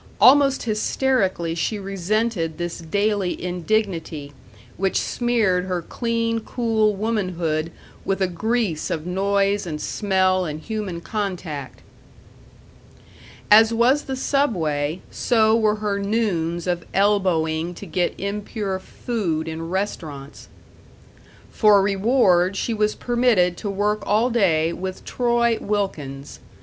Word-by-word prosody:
Almost 275 0 +6
hysterically 215 -6 0
she 170 +6 -1
resented 195 -3 -1
this 175 0 -4
daily 200 +2 -1
indignity, 175 -5 -2 0.4
which 195 +1 0
smeared 220 -7 +1
her 180 -2 -2
clean, 230 +1 -1
cool 220 -2 0
womanhood 180 -7 -1 0.3
with 195 - -1
a 190 - +3
grease 200 -2 -1
of 155 -1 -3
noise 200 +1 +1
and 155 -2 -4
smell 185 -1 +1
and 155 -3 -4
human 205 -3 -4
contact. 175 -10 -5 1.7
As 225 +2 +7
was 255 +6 +3
the 265 - -3
Subway, 170 - 0
so 220 -2 +3
were 215 -2 +2
her 210 -2 -2
noons 190 -6 -1
of 175 -1 -1
elbowing 175 -5 +1
to 200 - -9
get 180 0 -1
impure 200 0 -3
food 185 -7 -3
in 165 +1 -5
restaurants. 155 -7 -5 1.0
For 210 -2 +5
reward 195 -2 +3
she 230 - -1
was 215 -1 0
permitted 235 -8 +2
to 205 - -4
work 205 +2 0
all 220 +5 +2
day 170 -8 +2
with 185 +1 -6
Troy 235 -2 +1
Wilkins. 150 -10 -3
195 Hz, 115 wpm, -22 LUFS, 170-220 Hz, 1.7 s, As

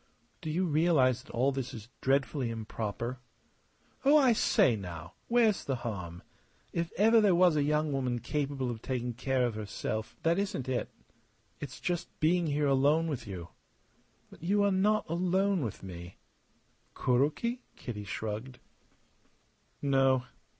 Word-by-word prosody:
"Do 160 - -4
you 175 +5 +1
realize 150 -6 +3
that - - -14
all 130 +4 +2
this 130 -3 -4
is 110 0 -10
dreadfully 135 -1 +1
improper?" 115 +2 -4 0.8
"Oh, 285 +3 +6
I 265 -5 +5
say, 130 - +3
now! 85 -4 -7
Where's 230 -4 +3
the 135 - -1
harm? 90 -6 -5 0.5
If 170 -1 -2
ever 225 +3 +6
there 200 -4 +4
was 175 -2 +5
a 150 - +3
young 150 +1 +1
woman 130 -3 0
capable 135 -1 -2
of 110 -2 -7
taking 125 -2 -2
care 130 +1 0
of 120 - -1
herself 110 +1 -4
" - - -34
"That 170 +3 +3
isn't 200 -11 -2
it. 130 -1 -1 0.7
It's 135 -3 -7
just 175 -1 -3
being 170 +2 +2
here 145 0 +1
alone 145 +4 +3
with 125 -7 -4
you." 90 -3 -7 0.8
"But - - -15
you 200 +5 +2
are 200 - +3
not 210 +3 +2
alone 185 +1 +1
with 110 -5 -5
me!" 90 -1 -9 0.8
"Kuroki?" 150 - +1
Kitty 105 -5 -6
shrugged. 110 +5 -5 1.3
"No. 135 -2 +3
135 Hz, 150 wpm, -30 LUFS, 115-170 Hz, 1.3 s, Oh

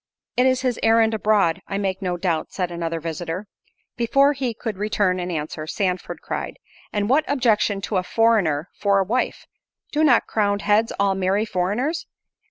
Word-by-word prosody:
"It 250 +1 +4
is 255 -1 +2
his 255 -3 -1
errand 225 0 +4
abroad, 200 -5 +2
I 195 - -3
make 195 -1 -2
no 180 -2 -1
doubt," 170 -3 -1
said 180 -2 -2
another 165 -1 -3
visitor. 165 +4 -4 0.5
Before 275 +5 +3
he 255 -4 -3
could 215 -4 -5
return 205 -3 +1
an 180 0 -3
answer, 155 -1 -4
Sandford 185 0 -2
cried, - - -4 0.3
"And 205 -1 -1
what 280 +6 +3
objection 220 -7 +2
to - - -2
a 185 - +1
foreigner 195 -8 +2
for 200 -1 +1
a 195 - +3
wife? 240 +6 -1 0.5
do 300 +1 +1
not 255 -7 +5
crowned 205 -2 0
heads 215 +2 +3
all 200 -1 +3
marry 190 +3 +1
foreigners? 220 - -1
205 Hz, 175 wpm, -22 LUFS, 180-230 Hz, 0.5 s, not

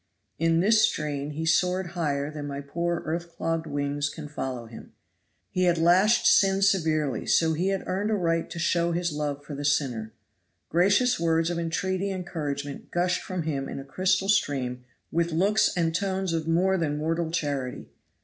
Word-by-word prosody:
In 165 +1 +3
this 215 +3 +4
strain 150 -7 0
he 155 +2 -4
soared 180 +2 +1
higher 150 -4 -1
than 150 -1 -6
my 140 0 -4
poor 170 +4 -2
earth 170 +1 -4
clogged 165 0 -2
wings 145 0 -1
can 150 0 -8
follow 130 -4 -5
him. 115 0 -12 0.6
He 185 0 +1
had 175 -1 +3
lashed 185 +7 +4
sin 195 0 +5
severely, 155 - +1
so 160 -1 +3
he 175 +4 0
had 195 -1 -1
earned 200 +3 -1
a 220 - +2
right 165 -3 0
to - - -7
show 170 0 +1
his 175 0 -1
love 145 -1 -3
for 150 - -7
the 145 +1 -5
sinner. 130 -6 0 0.6
Gracious 200 +9 +3
words 165 0 +1
of 170 - -2
entreaty 185 +4 -1
and 185 -2 -4
encouragement 145 -4 -5
gushed 175 +1 0
from 185 -3 -4
him 140 -3 -3
in - - -6
a 135 - -7
crystal 185 +6 +1
stream 130 -11 0 0.3
with 170 +1 0
looks 200 +7 +3
and 165 -2 +1
tones 190 -1 -1
of 160 -1 -2
more 185 +3 +2
than 150 -3 -1
mortal 165 +2 -1
charity. 145 -6 -3
165 Hz, 180 wpm, -26 LUFS, 145-180 Hz, 0.6 s, sin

